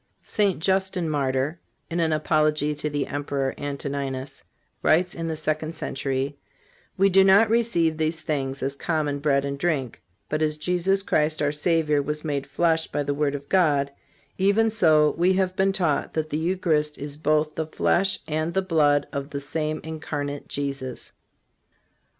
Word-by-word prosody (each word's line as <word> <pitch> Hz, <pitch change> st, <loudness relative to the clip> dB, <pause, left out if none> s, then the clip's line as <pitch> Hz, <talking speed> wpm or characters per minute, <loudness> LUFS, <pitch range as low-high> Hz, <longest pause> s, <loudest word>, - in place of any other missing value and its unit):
St. 200 Hz, -3 st, +1 dB
Justin 190 Hz, 0 st, 0 dB
Martyr, 140 Hz, +1 st, -1 dB, 0.3 s
in 170 Hz, +1 st, -3 dB
an 165 Hz, -1 st, +2 dB
apology 155 Hz, -1 st, +1 dB
to 150 Hz, +1 st, -3 dB
the 145 Hz, -1 st, -1 dB
Emperor 140 Hz, -2 st, -2 dB
Antoninus, 140 Hz, -1 st, -4 dB, 0.4 s
writes 175 Hz, +3 st, +3 dB
in 165 Hz, -1 st, -4 dB
the 160 Hz, -, -2 dB
second 155 Hz, +1 st, -2 dB
century: 135 Hz, +1 st, -3 dB, 0.6 s
"We 195 Hz, +1 st, +5 dB
do 190 Hz, +1 st, +6 dB
not 200 Hz, +3 st, +5 dB
receive 190 Hz, -9 st, +2 dB
these 160 Hz, +1 st, -1 dB
things 135 Hz, -4 st, -3 dB
as 135 Hz, +1 st, -2 dB
common 150 Hz, -2 st, -1 dB
bread 140 Hz, -1 st, +2 dB
and 140 Hz, 0 st, -4 dB
drink; 140 Hz, -8 st, -1 dB, 0.3 s
but 155 Hz, +1 st, -2 dB
as 155 Hz, -1 st, +1 dB
Jesus 180 Hz, +4 st, +1 dB
Christ 155 Hz, -3 st, +1 dB
our 145 Hz, -1 st, +1 dB
Savior 150 Hz, -1 st, +1 dB
was 150 Hz, +2 st, -4 dB
made 140 Hz, -2 st, -2 dB
flesh 160 Hz, +2 st, +1 dB
by 145 Hz, -, -2 dB
the 145 Hz, 0 st, -1 dB
word 145 Hz, 0 st, 0 dB
of 140 Hz, 0 st, -7 dB
God, 145 Hz, -7 st, +2 dB, 0.5 s
even 205 Hz, +4 st, +3 dB
so 155 Hz, -8 st, +4 dB
we 180 Hz, +2 st, +4 dB
have 185 Hz, -1 st, 0 dB
been 195 Hz, +1 st, +2 dB
taught 175 Hz, -7 st, 0 dB
that 155 Hz, -1 st, -2 dB
the 150 Hz, -, 0 dB
Eucharist 160 Hz, -4 st, 0 dB
is 145 Hz, 0 st, -6 dB
both 155 Hz, 0 st, +1 dB
the 160 Hz, -1 st, -3 dB
flesh 190 Hz, +4 st, +1 dB
and 155 Hz, +2 st, -2 dB
the 190 Hz, -, +2 dB
blood 150 Hz, -5 st, +3 dB
of 140 Hz, 0 st, -4 dB
the 140 Hz, -, -4 dB
same 155 Hz, +2 st, -2 dB
incarnate 145 Hz, -2 st, -5 dB
Jesus." 135 Hz, -3 st, -5 dB
155 Hz, 165 wpm, -25 LUFS, 145-170 Hz, 0.6 s, do